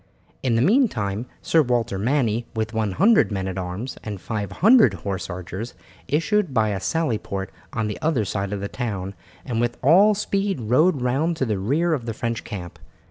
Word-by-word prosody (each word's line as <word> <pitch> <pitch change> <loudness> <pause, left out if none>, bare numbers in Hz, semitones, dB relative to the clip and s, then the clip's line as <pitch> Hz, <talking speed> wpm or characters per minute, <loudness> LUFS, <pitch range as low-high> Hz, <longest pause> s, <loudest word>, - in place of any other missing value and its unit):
In 125 -3 +1
the 115 - +3
meantime 125 - +1 0.2
Sir 165 - +4
Walter 120 -7 0
Manny, 120 -1 0
with 110 +1 -2
100 115 - +3
men 95 -2 -2
at 95 0 -3
arms 95 +8 -5
and 105 -3 -5
500 115 - +3
horse 95 -2 -4
archers, 90 +6 -6 0.3
issued 165 +3 +1
by 110 -2 +3
a 100 -2 -2
sally 135 - 0
port 95 -2 -5 0.2
on 110 -6 -2
the 105 - -5
other 145 -9 +1
side 100 0 -3
of 100 -1 -3
the 100 - -2
town, 100 -6 -4 0.3
and 115 -2 -1
with 120 0 -1
all 195 +9 +6
speed 195 -2 -1
rode 130 +6 +2
round 150 +7 0
to 135 - 0
the 105 -5 -1
rear 155 - +1
of 125 -6 -3
the 115 - -3
French 115 -1 -3
camp. 90 -6 -7
115 Hz, 185 wpm, -23 LUFS, 100-155 Hz, 0.3 s, all